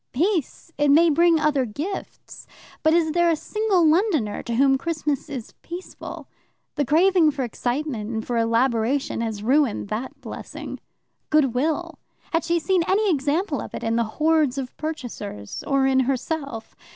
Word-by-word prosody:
Peace? 330 +1 -1
It 290 0 +3
may 325 +3 +6
bring 335 +1 +4
other 300 -3 +2
gifts, 290 - -6 0.3
but 315 +1 +4
is 325 -2 +2
there 345 +1 +3
a 330 - +3
single 395 -1 +1
Londoner 310 - +2
to 235 - -4
whom 270 +2 +4
Christmas 300 -1 -2
is 255 -6 -6
peaceful? 350 +2 -8 0.5
The 290 - 0
craving 335 +3 +4
for 280 -2 -2
excitement 245 -1 -3
and 220 -1 -3
for 245 - -2
elaboration 230 +2 +1
has 220 -3 -3
ruined 255 -4 +2
that 225 +5 -4
blessing. - - -8 0.5
Goodwill? 305 +4 +1 0.3
Had 330 - +2
she 340 0 +1
seen 345 +3 +1
any 405 +1 +3
example 300 +6 0
of - - -8
it - - -6
in 225 0 0
the 235 - +2
hordes 305 -4 +2
of 260 -2 -5
purchasers? 240 - -6
Or 275 -1 +2
in 265 0 +3
herself. 270 -2 -2
290 Hz, 155 wpm, -23 LUFS, 245-330 Hz, 0.5 s, may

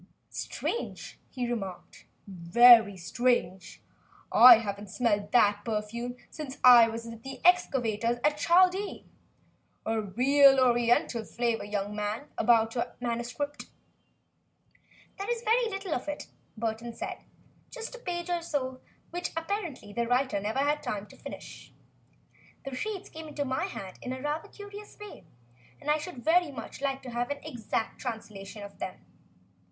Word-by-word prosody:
"Strange," 470 - -4
he 250 -2 -3
remarked, 195 -7 -6 0.2
"very 205 +3 +6
strange. 190 -3 -1 0.5
I 245 -1 +10
haven't 205 -2 -5
smelt 205 -1 0
that 205 -3 +4
perfume 230 +3 -3 0.2
since 295 -4 -7
I 240 -2 +9
was 230 0 -5
with 230 -1 -9
the 265 +1 -8
excavators 240 -10 +2
at 295 0 +3
Chaldea. 370 +5 +3 0.8
A 225 0 0
real 270 +7 +5
Oriental 240 -2 +2
flavor, 235 +1 -1
young 205 0 -3
man, 210 +7 -3
about 225 -2 +3
your 235 - -3
manuscript." 245 +5 -4 1.5
"There 395 +3 -4
is 475 -1 -2
very 465 +1 +2
little 390 -4 -4
of 250 - -3
it," 295 0 -4 0.3
Burton 230 +1 -3
said, 365 +1 -5 0.5
"just 470 -1 -7
a - - -9
page 355 -5 -4
or 345 -1 0
so 260 -5 -3 0.3
which 350 0 -3
apparently 330 - -4
the 235 +2 -1
writer 250 -3 +1
never 210 +5 -3
had 295 +2 +1
time 210 -7 -4
to - - -14
finish. - - -10 0.9
The 270 -1 -5
sheets 405 +7 -4
came 320 0 -9
into 295 -1 -3
my 260 +6 -1
hands 195 - -7
in 255 +1 -5
rather 300 +2 -3
a - - -26
curious 410 0 -11
way, 415 - -11 0.5
and 300 0 -1
I 305 - +2
should 300 -7 -8
very 345 +1 +4
much 270 - -9
like 270 -1 -2
to 250 - -7
have 240 +2 -2
an 285 - -2
exact 225 -2 -4
translation 210 -2 -7
of 200 - -11
them. 185 - -6
245 Hz, 145 wpm, -29 LUFS, 220-300 Hz, 1.5 s, I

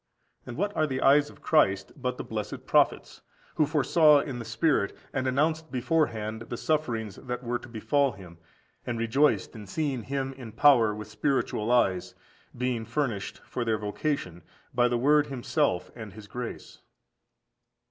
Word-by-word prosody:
And 120 - -7
what 205 +4 -1
are 155 - +2
the 130 -2 -2
eyes 145 +1 +5
of - - -17
Christ 100 -11 +2
but 125 -2 -3
the - - -4
blessed 110 -2 -5
prophets, - - +2 0.3
who 155 - +2
foresaw 150 0 +5
in 135 -3 -4
the 115 - -6
Spirit, 145 -10 +1 0.2
and 130 -1 -1
announced 155 +4 0
beforehand, 120 -6 0
the 120 - -4
sufferings 115 -11 -1
that 125 -1 -5
were 120 0 -1
to 120 - -12
befall 135 +4 +1
Him, 90 -3 -13 0.4
and 120 - -3
rejoiced 115 -1 +2
in 105 -2 -9
seeing 140 +1 -2
Him 135 +3 -3
in 125 -5 -10
power 115 -5 +5
with 105 -1 -7
spiritual 110 0 -1
eyes, 95 -7 +2 0.4
being 125 -2 -1
furnished 115 -3 -3
(for 125 - -3
their 110 -2 +1
vocation) 105 - -3 0.3
by 120 0 +3
the 120 0 0
word 145 +4 +4
Himself 135 - -1
and 110 -4 -8
His 110 0 -11
grace? 120 +3 -7
125 Hz, 160 wpm, -28 LUFS, 110-145 Hz, 0.4 s, eyes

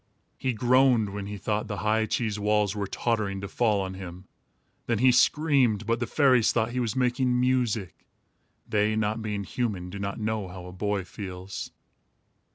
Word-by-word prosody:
He 130 -2 0
groaned 125 -1 +3
when 100 0 -5
he 105 0 -5
thought 105 +3 -2
the 105 -2 -4
high 110 +1 +2
cheese 110 -3 -1
walls 105 0 +1
were 100 -1 -2
tottering 105 -3 -1
to 100 - -4
fall 105 -2 +1
on 95 0 -4
him. 95 -1 -9 0.6
Then 115 - +1
he 130 +4 +5
screamed, 125 -5 +3
but 115 +1 0
the 120 - -2
fairies 130 -6 +4
thought 115 0 0
he 125 - -2
was 120 -1 -1
making 125 0 +1
music. 120 -7 0 0.6
They, 105 0 +1
not 110 +1 -1
being 105 -2 -3
human, 95 -5 -3
do 100 - -6
not 100 +1 -4
know 110 -2 -2
how 90 0 -9
a 90 - -8
boy 100 +1 -2
feels. 95 0 -7
110 Hz, 175 wpm, -27 LUFS, 100-120 Hz, 0.6 s, he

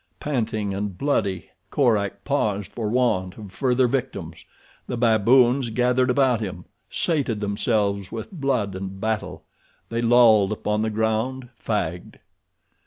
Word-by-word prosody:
Panting 110 -7 -2
and 100 -2 -4
bloody, 100 - -1 0.2
Korak 100 -7 +1
paused 105 -9 -1
for 110 -3 -3
want 105 -7 0
of 105 -4 -10
further 125 +4 +2
victims. 110 - -4 0.4
The 125 - -3
baboons 120 +3 +4
gathered 125 +3 +2
about 125 -3 +2
him, 95 -4 -5 0.2
sated 140 -10 0
themselves 100 -1 -1
with 110 -1 -6
blood 135 - -1
and 95 +1 -6
battle. 110 +1 -3 0.5
They 115 0 -2
lolled 115 -4 +5
upon 105 0 -1
the 110 - 0
ground, 110 +4 -1
fagged. 90 -7 -3
110 Hz, 125 wpm, -23 LUFS, 100-125 Hz, 0.5 s, lolled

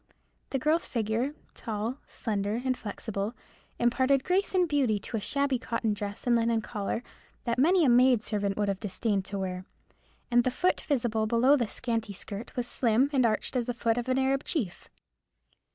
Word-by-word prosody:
The 270 - 0
girl's 310 +6 +1
figure, 230 +5 -1 0.2
tall, 225 +4 -4
slender, 210 0 -2
and 255 -1 +2
flexible, 210 0 -4 0.4
imparted 260 +3 +2
grace 380 +2 +1
and 360 -1 +4
beauty 275 -8 +2
to 205 - -6
a - - -1
shabby 280 +3 0
cotton 230 -3 -1
dress 205 0 -5
and 240 -1 +4
linen 230 -1 +2
collar, 210 +2 -3 0.4
that 235 0 -1
many 340 +4 +5
a - - +4
maid 245 -1 +5
servant 205 -3 -1
would 205 -1 +1
have 195 -1 -1
disdained 205 -1 -1
to 200 - -4
wear; 185 -1 -3 0.7
and 240 0 +5
the 255 - +2
foot 360 +8 +1
visible 230 -6 0
below 240 +5 +5
the 240 -5 0
scanty 225 -3 -2
skirt 200 +3 -8
was 245 - -1
slim 245 +3 +2
and 255 -4 +4
arched 215 +4 -1
as 245 -2 0
the 245 - -2
foot 230 -1 +1
of 245 +1 -4
an 255 - +2
Arab 265 +1 +1
chief. 230 - -3
235 Hz, 185 wpm, -29 LUFS, 210-260 Hz, 0.7 s, many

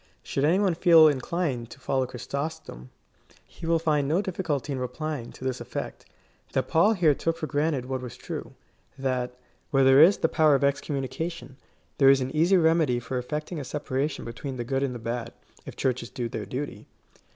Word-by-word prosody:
Should 140 - -1
any 165 +5 +4
one 195 -3 +2
feel 165 -2 +7
inclined 140 -3 -1
to - - -12
follow 130 -1 0
Chrysostom, 140 - -6 0.6
he 165 - -9
will 165 0 +3
find 150 -3 +1
no 160 +5 +2
difficulty 170 -7 -2
in 130 - -3
replying, 135 0 -4
to - - -12
this 130 -1 -2
effect: - - -6 0.5
that - - 0
Paul 200 +7 +4
here 170 -7 +4
took 165 +3 -2
for 160 - -3
granted 145 -3 0
what 130 0 -3
was 125 -2 -8
true - - -7 0.2
— - - -38
that, 125 -2 -2 0.3
where 135 -3 +3
there 135 +2 +7
is 180 +6 +7
the - - +2
power 155 -2 +4
of 135 - 0
excommunication, 140 0 -2 0.4
there 135 -1 +7
is 135 0 +6
an 130 +3 -3
easy 175 +5 +4
remedy 160 -7 +3
for 125 +2 -3
effecting 150 +6 -4
a - - -4
separation 145 +1 -3
between 125 +3 -6
the 120 - -2
good 135 +3 -1
and 135 -3 -1
the - - -4
bad, 115 +1 -4 0.3
if - - -8
Churches 125 -2 -1
do 120 -2 -4
their 110 -3 -5
duty. 135 +7 -5
140 Hz, 195 wpm, -26 LUFS, 125-160 Hz, 0.6 s, feel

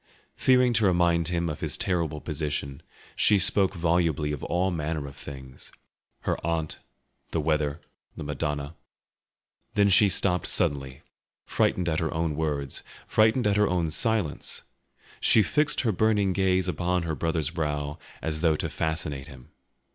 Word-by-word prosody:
Fearing 125 -1 +4
to 110 -2 +2
remind 85 -2 +3
him 85 -1 0
of 75 -2 -4
his - - -3
terrible 85 -4 -1
position, 75 -3 -4 0.3
she 105 - +4
spoke 95 +1 +3
volubly 85 -3 +1
of 75 - -5
all 90 +3 +1
manner 80 -2 -2
of 70 0 -9
things—her 65 -2 -8
aunt, 80 -2 -2 0.5
the 85 - -1
weather, 75 0 0 0.4
the - - -5
Madonna. 75 0 -3 1.0
Then 100 0 +4
she 100 +1 +6
stopped 90 -2 +1
suddenly, 70 -2 -1 0.4
frightened 90 -1 +1
at 80 -1 +1
her 80 -2 -1
own 80 -2 -1
words, 75 -3 -2 0.2
frightened 110 +3 +3
at 105 -1 +2
her 105 0 +4
own 85 -4 0
silence; 110 -4 0 0.6
she 110 - +5
fixed 150 +7 +1
her 115 - +1
burning 105 -1 +2
gaze 95 -1 +2
upon 90 +1 0
her 80 -1 -2
brother's 80 0 -1
brow 75 -2 -3 0.2
as 80 -1 -2
though 80 -3 +3
to - - -3
fascinate 80 -4 -2
him. 65 -4 -13
80 Hz, 145 wpm, -27 LUFS, 75-95 Hz, 1.0 s, she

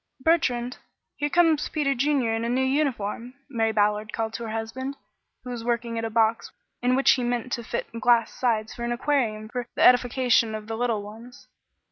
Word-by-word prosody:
"Bertrand, 255 -6 +1 0.4
here 290 0 -1
comes 325 -2 +3
Peter 290 -3 0
Junior 270 -3 +1
in 225 0 -1
a 235 - -1
new 255 +2 +1
uniform," 255 -4 -1
Mary 225 -5 0
Ballard 210 0 +1
called 225 -1 -3
to 235 - -5
her - - -5
husband, 240 +5 -4 0.5
who 250 - -7
was 235 -2 -5
working 235 -1 -1
at - - -4
a 225 - -2
box 225 0 +1 0.3
in 250 +1 +2
which 270 - +5
he 255 - +1
meant 245 0 -2
to 235 - -2
fit - - -3
glass 235 -1 +3
sides 220 -3 -1
for 235 - -7
an 235 - -2
aquarium 240 -5 0
for 245 +1 -5
the - - +1
edification 245 -2 +4
of 215 -1 -6
the 225 +1 -4
little 230 -3 -1
ones. 225 +4 -12
240 Hz, 195 wpm, -25 LUFS, 225-260 Hz, 0.5 s, which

